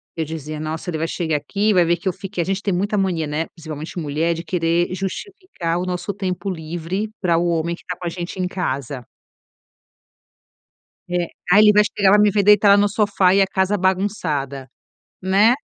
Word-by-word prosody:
eu 160 - -2
dizia: 155 -1 -6
"Nossa, 155 +3 -4
ele 165 - -2
vai 165 - -1
chegar 160 -3 -1
aqui, 205 +8 0
vai 180 -2 +4
ver 170 +1 +2
que 175 - -7
eu 185 - +1
fiquei". 195 0 -5
A - - -7
gente 195 +1 -2
tem 200 -2 -1
muita 200 +4 0
mania, 180 -5 0
né, 150 +3 -2
principalmente 155 0 -7
mulher, 160 +2 0
de 165 0 -6
querer 170 0 0
justificar 195 - -4
o 180 - -2
nosso 180 +2 -3
tempo 185 -1 -3
livre, 175 +4 -4
para 170 -4 +2
o 175 +1 +1
homem 170 0 0
que - - -18
está 180 - -6
com 180 - -8
a - - 0
gente 175 +2 -6
em 180 - 0
casa. 140 - -4 2.0
É. 175 -1 0 0.2
"Ah, 200 - +7
ele 210 0 +7
vai 210 0 +6
chegar, 205 -2 +2
vai 205 - +6
me 210 0 +5
ver 205 0 +2
deitada 205 0 +6
no 205 0 +4
sofá, 200 -3 +2
e 200 - +4
a 195 - +3
casa 190 +2 +1
bagunçada", 175 -9 -1 0.5
né. 200 +6 +4
180 Hz, 205 wpm, -21 LUFS, 165-200 Hz, 2.0 s, Ah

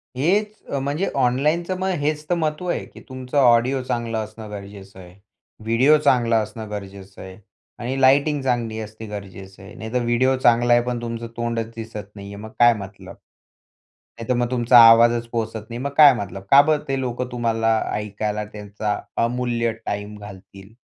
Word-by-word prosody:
हेच 200 +10 +1 0.3
म्हणजे 145 +8 -2
ऑनलाईनचं 150 +8 +1
मग 190 - -1
हेच 150 +1 -1
तर 175 - +2
महत्त्व 155 +2 -2
आहे, - - -2
की - - -15
तुमचं 130 +2 -5
ऑडिओ 125 +1 +4
चांगलं 115 -2 -3
असणं 110 0 -10
गरजेचं 100 -1 -10
आहे. 90 -1 -14 0.5
व्हिडिओ 125 +7 +4
चांगला 120 -5 +2
असणं 110 0 -7
गरजेचं 100 -2 -9
आहे 95 0 -10 0.4
आणि 130 +3 -3
लाइटिंग 140 +2 +3
चांगली 120 -4 -2
असणे 110 +1 -8
गरजेचं 95 -2 -10
आहे. 95 - -12
नाही 110 0 -8
तर 125 -1 0
व्हिडिओ 130 +3 +2
चांगला 120 0 +4
आहे 120 - +4
पण 120 -1 -3
तुमचं 115 0 -5
तोंडच 115 -1 -2
दिसत 110 -3 -8
नाही 100 -1 -9
आहे, 100 - -9
मग 110 - -8
काय 120 0 +7
मतलब. 100 -1 -10 1.0
नाहीतर 120 +2 -1
मग 120 0 -1
तुमचा 120 0 +5
आवाजच 115 +1 +4
पोहचत 115 -1 -4
नाही, 115 - -6
मग 140 - -2
काय 145 -3 +9
मतलब, 100 -3 -6
का 140 +1 +9
बरं 150 0 0
ते 135 -1 -1
लोकं 125 0 -3
तुम्हाला 115 -2 0 0.2
ऐकायला 105 0 -3
त्यांचा 105 0 -5 0.3
अमूल्य 120 -1 -1
टाईम 105 +1 -4
घालतील. 100 0 -13
115 Hz, 170 wpm, -22 LUFS, 105-130 Hz, 1.0 s, काय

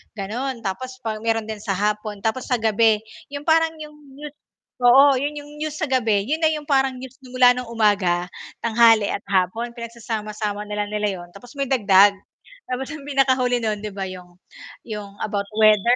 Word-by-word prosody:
gano'n. 230 +5 -4
Tapos 255 +7 -4
pag 215 -1 -3
meron 225 0 0
din 215 -1 -5
sa 195 - -1
hapon, 210 +1 -2
tapos 225 +3 -1
sa 250 - +2
gabi 220 0 +3 0.3
'yong 285 0 -6
parang 325 0 +3
'yong 305 -1 -10 0.2
new 295 +2 -8 0.5
oo, 260 +2 +6
'yon 290 +2 -2
'yong 290 0 -9
news 305 -1 -3
sa 315 - -4
gabi, 225 -6 +1
yun 310 +4 0
na - - +6
'yong 300 -1 -3
parang 270 -2 +2
news 260 0 -10
na 260 -1 -15
mula 250 -1 +7
ng 250 -1 -5
umaga, 205 -6 +1 0.4
tanghali, 225 -2 +4
at - - -2
hapon 200 +6 0
pinagsasama-sama 215 -3 -4
na 210 0 -5
lang - - -6
nila 210 0 0
'yon, 175 - -11
tapos 240 +5 -13
may 275 - 0
dagdag. 200 -5 +5 0.6
Tapos 255 +1 -3
'yung 310 -3 -8
pinakahuli 260 -3 +2
no'n, 215 -2 -2
'di 210 - -4
ba, 195 -1 -4
'yong 180 -1 -10 0.6
,'yong 205 -2 -7
about 200 -1 -2 0.2
weather 215 +2 +5
230 Hz, 190 wpm, -22 LUFS, 210-260 Hz, 0.6 s, mula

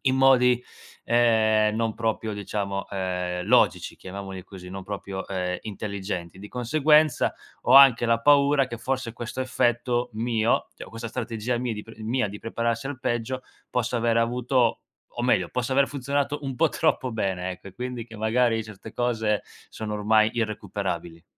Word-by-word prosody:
in 130 -1 +2
modi, 125 -2 +5 0.4
ehm, 110 -2 +3
non 115 -1 0
proprio 110 -1 -2
diciamo, 100 -1 -3
ehm, 90 -2 -2
logici, - - +3
chiamiamoli 95 0 -7
così, 95 -2 -11
non 95 +1 -7
proprio, 100 -1 -5
ehm, 90 -2 -2
intelligenti. 100 -4 -5
Di 105 - -9
conseguenza, 150 +4 +3 0.3
ho - - +2
anche 135 -4 +8
la 115 0 +2
paura 140 0 +5
che 120 - -6
forse 130 -1 -2
questo 120 +2 -5
effetto 120 -1 0
mio 115 0 +1
cioè - - -8
o - - -14
questa 115 +1 -6
strategia 115 0 -3
mia 125 -1 -2
di 105 -1 -6
pr 115 - -12
mia 115 0 0
di 105 +1 -8
prepararsi 115 +1 -2
al 145 -3 -5
peggio, 120 +2 -2 0.3
possa 125 0 0
aver 115 0 +1
avuto 120 0 +1 0.4
o - - 0
meglio, 100 -8 +2
possa 125 +1 -2
aver 135 +1 +3
funzionato 140 +1 -1
un 135 -2 -3
po' 160 +5 +3
troppo 130 -1 0
bene 95 -5 -2
ecco 90 - -9
e - - -13
quindi 125 0 -5
che 115 -1 -12
magari 115 +1 +2
certe 110 0 -11
cose 110 -4 0 0.3
sono 105 -1 -5
ormai 110 +1 +3
irrecuperabili. 100 -6 -3
115 Hz, 165 wpm, -25 LUFS, 105-125 Hz, 0.4 s, anche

